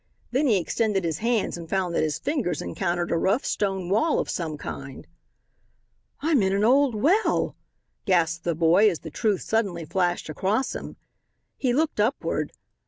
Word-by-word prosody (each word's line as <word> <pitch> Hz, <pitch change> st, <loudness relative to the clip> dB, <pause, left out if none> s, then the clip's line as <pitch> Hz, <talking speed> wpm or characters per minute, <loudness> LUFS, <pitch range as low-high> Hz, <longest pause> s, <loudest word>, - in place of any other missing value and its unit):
Then 275 Hz, +4 st, +2 dB
he 220 Hz, -5 st, +4 dB
extended 195 Hz, +2 st, 0 dB
his 165 Hz, -2 st, -2 dB
hands 230 Hz, -5 st, 0 dB
and 165 Hz, -1 st, -9 dB
found 185 Hz, -3 st, 0 dB
that -, -, +1 dB
his 155 Hz, -1 st, 0 dB
fingers 240 Hz, -, -1 dB
encountered 175 Hz, -, -2 dB
a 170 Hz, -, +2 dB
rough 195 Hz, +9 st, +1 dB
stone 195 Hz, -3 st, -1 dB
wall 220 Hz, -, +2 dB
of -, -, -1 dB
some 160 Hz, -4 st, -3 dB
kind. 135 Hz, -2 st, -7 dB, 1.2 s
"I'm 300 Hz, -5 st, +3 dB
in 190 Hz, 0 st, +1 dB
an 200 Hz, +1 st, +1 dB
old 260 Hz, +1 st, +4 dB
well," 345 Hz, -, +2 dB, 0.5 s
gasped 170 Hz, -3 st, +2 dB
the 170 Hz, -2 st, 0 dB
boy 170 Hz, +6 st, +5 dB
as 175 Hz, -, -4 dB
the 160 Hz, -, -8 dB
truth 210 Hz, +2 st, 0 dB
suddenly 195 Hz, -7 st, -1 dB
flashed 175 Hz, +1 st, 0 dB
across 195 Hz, -, -1 dB
him. -, -, -7 dB, 0.6 s
He 255 Hz, -, 0 dB
looked 305 Hz, 0 st, 0 dB
upward. 225 Hz, +7 st, 0 dB
195 Hz, 170 wpm, -25 LUFS, 170-230 Hz, 1.2 s, boy